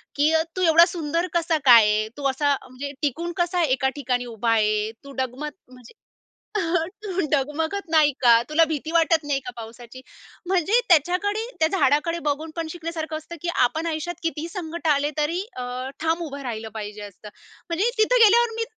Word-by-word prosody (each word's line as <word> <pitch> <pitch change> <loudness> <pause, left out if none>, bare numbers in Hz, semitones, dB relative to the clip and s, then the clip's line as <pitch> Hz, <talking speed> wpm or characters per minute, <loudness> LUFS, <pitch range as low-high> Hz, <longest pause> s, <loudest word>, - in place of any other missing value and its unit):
की, 300 +3 +2 0.2
"तू 370 - -2
एवढा 335 0 +7
सुंदर 335 0 -2
कसा 335 -1 +1
काय 235 -4 +9
आहे? 210 +1 +1
तू 285 - -6
असा 285 +1 +1
म्हणजे 275 +3 -6
टिकून 330 +5 -2
कसा 350 0 +1
एका 265 -2 +1
ठिकाणी 250 -3 -2
उभा 230 -1 -2
आहे? 215 -1 +1
तू 280 - -11
डगमग 260 +4 -4 0.2
म्हणजे, 250 -2 -16 1.1
तू 380 -2 -2
डगमगत 320 +7 -1
नाही 310 -3 +4
का? 235 -2 +6
तुला 320 +2 +4
भीती 310 +1 -4
वाटत 330 -2 +3
नाही 275 -2 0
का - - -3
पावसाची?" 235 +2 -10 0.4
म्हणजे 380 +6 +2
त्याच्याकडे, 370 +7 +2
त्या 315 - +4
झाडाकडे 330 +4 +2
बघून 305 +3 -2
पण 330 -1 -3
शिकण्यासारखं 320 -2 -5
असतं, 315 +2 -10
की 345 - -3
आपण 315 +7 +1
आयुष्यात 330 +2 -3
कितीही 330 0 -3
संकट 340 -3 -5
आले 290 0 +2
तरी 315 +4 0 0.2
अ, 250 - -4 0.4
ठाम 325 +2 0
उभं 280 -2 -7
राहिलं 225 -3 -5
पाहिजे 210 -1 -6
असं. 205 +1 -11 0.4
म्हणजे 385 +8 +1
तिथं 480 +3 +3
गेल्यावर 460 +2 +4
मी 455 - -1
310 Hz, 175 wpm, -23 LUFS, 255-340 Hz, 1.1 s, काय